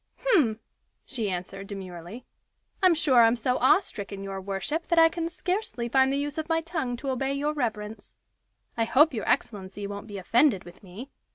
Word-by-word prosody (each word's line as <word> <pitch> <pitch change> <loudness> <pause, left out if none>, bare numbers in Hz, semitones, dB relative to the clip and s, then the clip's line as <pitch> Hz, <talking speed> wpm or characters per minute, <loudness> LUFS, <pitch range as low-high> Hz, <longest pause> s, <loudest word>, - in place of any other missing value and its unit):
"Hem!" 235 - +3 0.5
she 230 -6 -3
answered, 190 +2 -5
demurely. 190 +3 -8 0.6
"I'm 370 -3 +5
sure 275 -6 +5
I'm 230 +1 +5
so 250 +2 0
awestricken, 205 - +1
your 195 -1 -5
worship, 200 - -3
that 340 - +1
I 325 0 +7
can 330 0 -3
scarcely 360 - -3
find 265 +1 +4
the 275 - 0
use 290 +2 -3
of 315 - -5
my 325 0 +2
tongue 320 -8 -3
to 270 +2 -3
obey 270 +1 -1
your 290 +2 -1
reverence. 220 -6 -4 0.6
I 230 - +1
hope 290 +6 +4
your 220 - -3
excellency 200 -1 -2
won't 200 +1 -6
be 205 -2 -7
offended 225 - +2
with 175 +1 -14
me. 210 +8 -10
240 Hz, 180 wpm, -27 LUFS, 200-295 Hz, 0.6 s, I